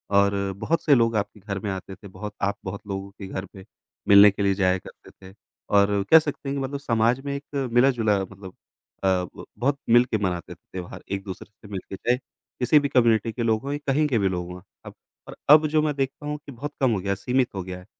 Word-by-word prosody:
और 100 -1 +2
बहुत 160 +11 -1
से 145 - +5
लोग 115 -2 +2
आपके 105 +1 -3
घर 100 0 -5
में 100 - -4
आते 95 0 -6
थे 100 - -13
बहुत 100 +2 -8
आप 100 +1 0
बहुत 100 +2 -5
लोगों 95 0 -5
के 100 -1 -10
घर 95 0 -5
पे, 95 -1 -14 0.4
मिलने 100 0 +9
के 100 0 -3
लिए 100 - +3
जाया 95 -1 +2
करते - - -15 0.2
थे - - -22 0.3
और 100 0 +3
कह 160 - +10
सकते 145 -2 -5
हैं 140 - -2
कि - - -2
मतलब 140 +1 -4
समाज 120 -2 +1
में 140 0 -2
एक 140 -2 -4
मिला-जुला 120 -5 +3
मतलब 95 -1 -12 0.5
अ, - - +2
ब 90 -2 -1
बहुत 140 +3 +1
मिलके 120 0 +4
मनाते 90 -4 -3
थे - - -36
त्योहार 90 -1 -7
एक-दूसरे 95 -2 -5
से 105 0 -17
मिलके 95 0 -6
चाहे 120 +5 +1 0.4
किसी 140 +4 +5
भी 145 - -1
कम्युनिटी 115 -3 +3
के 120 - -3
लोग 110 -1 +1
हों 140 - -4
या - - -1
कहीं 150 +3 +2
के 130 -5 +1
भी 100 - +2
लोग 90 -1 -3
वहाँ 90 0 -10 0.2
अब, - - -9 0.3
और - - -9
अब 155 +1 +8
जो 155 0 +2
मैं 150 -1 0
देखता 135 +1 -3
हूँ 150 0 -3
कि - - -9
बहुत 145 +4 -6
कम 130 - +4
हो 105 - 0
गया, 100 +1 -1
सीमित 125 +4 0
हो 95 - -3
गया 90 0 -7
है। 90 - -15
105 Hz, 240 wpm, -24 LUFS, 95-135 Hz, 0.5 s, कह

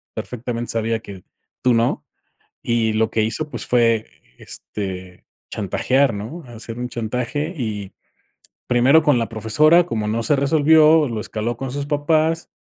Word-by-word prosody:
perfectamente 120 -1 -4
sabía, 115 0 -1
que 100 -4 -11 0.4
tú 125 - +4
no, 115 +1 0 0.6
y 115 -2 +1
lo 110 0 +1
que 110 - +1
hizo, 150 +8 -2
pues - - -4
fue, 115 -2 +2 0.3
este, 95 -3 -7 0.3
chantajear, 125 +6 +1
¿no?, 120 +12 -7
hacer 115 0 -8
un 125 0 -3
chantaje, 125 +8 -3
y, 105 -7 -4 0.8
primero 130 +6 +4
con 145 -4 +3
la 115 - -2
profesora 150 +10 +3
como 110 -10 -3
no 115 +2 -1
se 145 - +3
resolvió, 155 +2 +5
lo 110 -2 -3
escaló 115 +2 -4
con 135 0 -5
sus 140 +1 -3
papás, 155 +2 +1
120 Hz, 145 wpm, -21 LUFS, 110-145 Hz, 0.8 s, resolvió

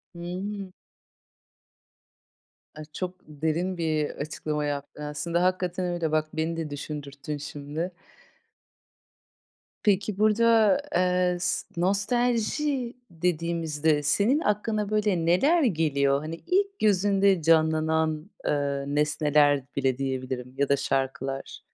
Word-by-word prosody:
Hıı. 185 +2 -5 2.0
A, 155 - -8
çok 180 +2 -3
derin 160 +5 -2
bir 155 -3 0
açıklama 150 0 -3
yaptın. 145 +1 -5
Aslında 170 +4 -1
hakikaten 185 0 0
öyle 165 -3 -1
bak, 155 0 +1
beni 160 +1 -2
de 160 -2 -3
düşündürttün 145 0 -6
şimdi. 145 +4 -5 1.9
Peki, 205 -1 +1
burada, 220 +2 +4 0.2
eee, 180 0 +2
s 175 - -1
nostalji 240 - 0 0.2
dediğimizde 160 -3 0
senin 210 - +3
aklına, 210 -3 0
böyle, 210 -5 +1
neler 280 - +4
geliyor? 145 - +2
Hani, 155 +2 -5
ilk 395 +2 +1
gözünde 195 -2 +3
canlanan, 160 +1 +2 0.2
ııı, 140 -1 -1
nesneler 150 -1 +3
bile 130 -2 +1
diyebilirim 130 -2 -3
ya 140 0 +1
da 140 - +5
şarkılar. 135 0 -2
165 Hz, 100 wpm, -26 LUFS, 150-195 Hz, 2.0 s, da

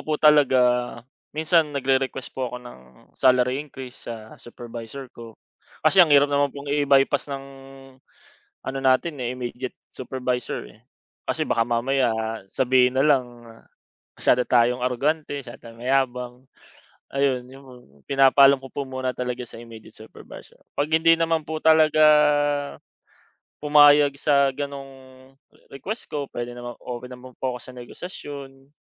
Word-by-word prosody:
po 155 - -2
talaga 150 -4 +5 0.8
minsan 155 -1 +2
nag-re-request 135 -1 -1
po 130 -1 -3
ako 125 - -7
ng 120 - -12 0.3
salary 125 +1 +2
increase 130 -4 -10
sa 110 -2 -8
supervisor 120 +2 -9
ko, 115 -2 -12 0.5
kasi 185 +5 +6
ang 175 - +7
hirap 145 -1 +4
naman 140 0 +2
pong 140 0 -5
i-bypass 140 0 +2
ng, 135 -1 -5 1.2
ano 135 0 -3
natin, 130 +5 +2
eh, 120 - -2
immediate 125 +1 -6
supervisor, 125 -2 -4
eh. 110 - -19 0.4
Kasi 155 -1 -2
baka 115 - +1
mamaya 120 +2 0 0.4
sabihin 130 +1 +2
nalang 125 -5 +1 0.7
masyado 125 0 +2
tayong 120 0 +3
arogante, 145 +3 -1
masyado 120 0 -11
tayong 115 0 -14
mayabang, 125 -1 0 0.8
ayun 135 -3 0
'yung 135 +2 -14
mga 125 -1 -14 0.3
pinapaalam 135 0 +6
ko 135 0 -13
po 140 - -3
muna 130 -1 -3
talaga 125 0 -4
sa 115 - -12
immediate 115 -2 -13
supervisor, 110 - -14 0.2
pag 145 +1 -1
hindi 160 +1 +4
naman 165 -1 0
po 155 0 -5
talaga 155 -1 +4 1.6
pumayag 145 -1 +6
sa 140 -2 +3
ganong 135 -2 -9 0.4
request 205 - -7
ko 145 -2 -3
puwede 120 -1 -6
namang 120 0 -8
open 125 0 -6
naman 130 +1 -13
po 130 -1 -2
ako 125 - -8
sa - - -11
negosasyon. 135 +1 -10
130 Hz, 135 wpm, -23 LUFS, 125-145 Hz, 1.6 s, ang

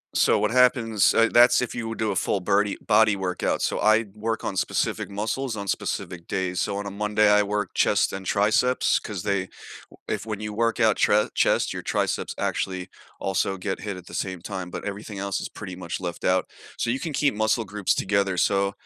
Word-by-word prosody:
So, - - +4
what 105 +1 +1
happens 120 -4 +3
eh, 115 0 +4
that's 120 +1 +6
if 125 - -3
you 115 -2 -3
would 115 - -6
do 110 -1 0
a - - -3
full 95 +3 0
birdie 100 +2 +1
body 110 -1 +4
workout, 90 -2 -1
so - - 0
I 110 +1 +4
work 110 +1 -3
on 95 - -3
specific - - -1
muscles 110 +5 -3
on 100 -1 -6
specific 85 -1 -3
days, 90 -1 -2
so 100 -1 -1
on 100 0 -4
a - - -5
Monday, 105 +1 +2
I 105 0 +5
work 105 -1 -3
chest - - +2
and 95 0 -6
triceps 110 +6 +2
'cause 100 -4 -5
they 100 -3 -1 0.4
w - - -18
if - - -2
when 105 -2 -5
you 105 -1 -5
work 115 +1 0
out 110 -1 +4
chre 105 +1 +3
chest, - - +2
your - - -5
triceps - - -1
actually, 95 -1 -2 0.3
also 95 0 -1
get 95 +1 -3
hit 100 -3 -5
at 90 - -13
the - - -11
same 95 -2 -3
time, 95 -1 -6
but - - -6
everything 100 0 -6
else 100 0 -2
is - - -5
pretty 95 -4 -8
much 85 -1 -5
left 85 -2 -5
out, 90 -1 +2 0.3
so - - -1
you 125 +3 0
can 160 -3 -4
keep 140 -3 +1
muscle 110 +1 +1
groups 100 0 0
together, 100 -2 0
so, 100 +2 +2
105 Hz, 215 wpm, -25 LUFS, 95-110 Hz, 0.4 s, that's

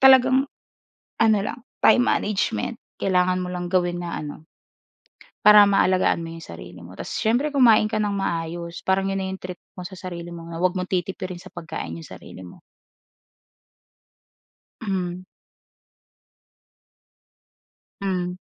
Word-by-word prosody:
talagang, 265 +1 +6 0.7
ano 220 -2 +5
lang, 210 - -4 0.2
time - - +7
management. 205 - 0 0.2
Kailangan 185 -1 +2
mo 180 - -4
lang 180 0 -3
gawin 175 -1 +1
na 175 -1 -4
ano 150 +1 -7 1.0
para 210 0 +9
maalagaan 190 -3 +3
mo 165 - -6
'yong 165 - -10
sarili 85 +2 -10
mo. 90 - -12
Tas - - -7
siyempre 245 +7 +1
kumain 235 -7 +5
ka 215 - -1
nang 210 -1 0
maayos, 170 -3 -3
parang 190 +1 +2
'yon 195 - -1
na 190 - -2
'yong 190 - -7
treat 180 -1 -6 0.2
mo 180 - -8
sa 190 - -11
sarili 175 -2 -7
mo 170 -1 -8
na 165 0 -7
wag 185 0 +2
mong 180 0 -4
titipirin 185 -1 -3
sa - - -12
pagkain 160 - -6
'yong 80 - -9
sarili 95 - -11
mo. 90 - -13 2.2
Hmm. 185 -3 -3 2.8
Hmm. 180 -2 -1
185 Hz, 140 wpm, -24 LUFS, 170-205 Hz, 2.8 s, para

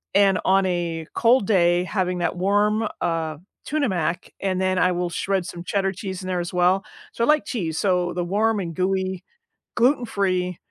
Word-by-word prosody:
and 195 -1 +4
on 195 0 +4
a 170 -3 -2
cold 235 -1 +3
day, 175 -3 +3
having 185 -1 -1
that 175 - -1
warm, 205 +4 +2
uh, 160 -2 -1 0.3
Tuna 300 -1 0
Mac, 175 -1 -2
and 190 -2 -1
then 185 0 +1
I 180 - +3
will 175 0 -1
shred 190 +1 -1
some 175 -1 -7
Cheddar 195 +1 0
cheese 190 -1 -6
in - - -6
there 180 -1 -1
as 175 0 -4
well. 180 +2 +3 0.3
So, 235 - -2
I - - +2
like 300 0 +3
cheese, 165 - -3
so 180 -1 +1
the 175 - -2
warm 210 +4 +1
and 170 -3 -4
gooey, 190 +1 -1 0.5
gluten-free 200 - +1
185 Hz, 185 wpm, -23 LUFS, 175-200 Hz, 0.5 s, and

